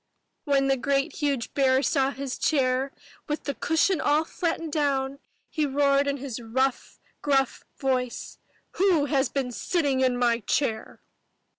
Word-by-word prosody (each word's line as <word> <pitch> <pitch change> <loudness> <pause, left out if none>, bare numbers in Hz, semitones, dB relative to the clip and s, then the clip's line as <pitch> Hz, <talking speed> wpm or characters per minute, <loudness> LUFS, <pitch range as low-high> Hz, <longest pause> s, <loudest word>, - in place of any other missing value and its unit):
'' - - -51
When 280 -2 +2
the 270 0 +2
great 275 +4 0
huge 280 -6 -1
bear 265 -1 +3
saw 275 -4 +2
his 275 -1 -5
chair 265 -2 +1 0.4
with 300 0 -3
the 280 - -2
cushion 325 +5 +1
all 300 +2 +2
flattened 330 -1 -3
down, 275 -2 0 0.3
he 305 -3 -1
roared 280 0 +2
in 280 0 0
his 255 -3 -6
rough, 255 +3 -1 0.2
gruff 270 -3 +1
voice, 255 -3 -2 0.4
"WHO 360 -6 +3
HAS 275 -3 +1
BEEN 260 -2 -2
SITTING 285 0 0
IN 255 -1 +2
MY 240 -1 +2
CHAIR?" 225 -1 -2
275 Hz, 150 wpm, -26 LUFS, 260-290 Hz, 0.4 s, bear